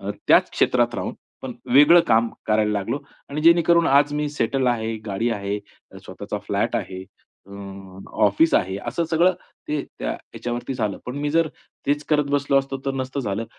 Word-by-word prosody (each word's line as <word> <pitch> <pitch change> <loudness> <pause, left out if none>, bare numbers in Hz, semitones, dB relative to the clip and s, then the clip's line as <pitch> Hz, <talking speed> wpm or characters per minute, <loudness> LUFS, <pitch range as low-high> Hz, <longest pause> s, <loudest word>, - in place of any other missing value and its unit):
अ, 100 +1 -4 0.2
त्याच - - +5
क्षेत्रात - - +1
राहून - - -4 0.3
पण 130 - -5 0.2
वेगळं 150 +5 +8
काम 115 +1 +3 0.2
करायला 105 0 +2
लागलो 100 +6 -2 0.3
आणि 150 - -3
जेणेकरून 170 0 +5
आज 145 +1 +4
मी 150 0 -1
सेटल 135 -1 0
आहे 110 -1 -3
गाडी 105 +4 -1
आहे, 100 -1 -2 0.5
स्वतःचा - - -6
फ्लॅट - - 0
आहे 95 0 -5 0.4
अ, 100 - -14 0.7
ऑफिस 130 +12 +3
आहे 95 +1 +1
असं 140 +8 -1
सगळं 175 +3 +4 0.4
ते 150 -1 -1 0.2
त्या - - -2
ह्याच्यावरती 120 +2 -6
झालं. 110 -5 -2
पण 125 - -5
मी 145 0 -1
जर 165 0 +2 0.4
तेच 145 +1 0
करत 150 -2 +3
बसलो 140 -1 +2
असतो, 135 0 -3
तर 135 - 0
नसतं 130 +1 -3
झालं 105 -2 -3
135 Hz, 170 wpm, -23 LUFS, 110-150 Hz, 0.7 s, वेगळं